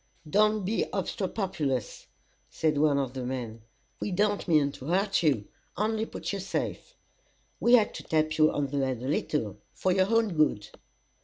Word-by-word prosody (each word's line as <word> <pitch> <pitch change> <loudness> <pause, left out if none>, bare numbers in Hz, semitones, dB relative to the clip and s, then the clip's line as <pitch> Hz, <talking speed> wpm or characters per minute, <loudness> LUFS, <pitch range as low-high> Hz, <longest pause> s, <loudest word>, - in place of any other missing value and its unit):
"Don't 210 +3 +3
be 220 +4 0
obstropolous," 185 - -2 0.4
said 155 -2 0
one 145 -2 +3
of 135 -3 -1
the 130 -1 -4
men. 120 -3 -5 0.4
"We - - -2
don't 205 +2 +1
mean 150 -4 +3
to 135 - -11
hurt 195 +6 +1
you; 135 -11 +1 0.3
only 220 +2 0
put - - -5
you 200 - -2
safe. 350 - -4 0.6
We 240 - +3
had 225 -4 +5
to - - -7
tap 155 0 0
you 155 0 +6
on 145 - -1
the 140 0 -1
head 130 -2 -2
a - - -3
little, 125 -8 -1 0.2
for 185 - +1
your 185 +1 +2
own 225 -4 +2
good." 130 -10 +1
155 Hz, 170 wpm, -28 LUFS, 135-200 Hz, 0.6 s, you